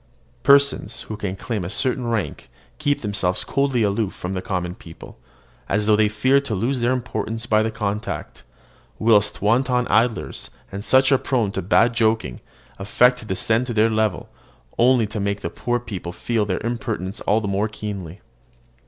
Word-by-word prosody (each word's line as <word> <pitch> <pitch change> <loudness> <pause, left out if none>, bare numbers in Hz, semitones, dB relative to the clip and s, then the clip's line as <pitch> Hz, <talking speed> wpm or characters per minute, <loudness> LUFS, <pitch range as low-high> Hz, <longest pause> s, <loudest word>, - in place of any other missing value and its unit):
Persons 140 +2 +3
who 110 - -6
can 100 -3 -4
claim 105 0 -4
a 85 - -4
certain 125 +3 0
rank 115 - -3 0.3
keep 145 -2 0
themselves 100 -4 0
coldly 135 -4 +1
aloof 100 -1 -1
from 90 +1 -5
the 95 - -3
common 90 -2 -3
people, 80 -6 -13 0.5
as 105 +1 +1
though 105 0 +5
they 105 0 +3
feared 130 +6 +2
to 110 - -2
lose 125 +7 -1
their 120 +1 +1
importance 115 -2 -3
by 110 -2 +3
the 110 - 0
contact; 105 -1 -4 0.6
whilst 105 -3 +2
wanton 125 +3 +2
idlers, 115 +1 0 0.2
and 100 +1 -6
such 130 +3 +4
as 135 - +5
are - - -18
prone 115 -7 0
to 95 - -3
bad 115 +6 +3
joking, 110 - 0 0.4
affect 125 +5 +3
to - - -10
descend 110 +5 0
to 120 - -4
their 110 +1 +3
level, 110 -4 0 0.5
only 120 -1 +4
to 105 +1 -5
make 100 0 -2
the 85 - -4
poor 120 0 -1
people 95 -7 -6
feel 110 +3 -1
their 95 +3 -2
impertinence 115 -4 -3
all 105 - +2
the 105 - -4
more 100 +2 0
keenly. 100 -4 -7
110 Hz, 180 wpm, -22 LUFS, 100-120 Hz, 0.6 s, though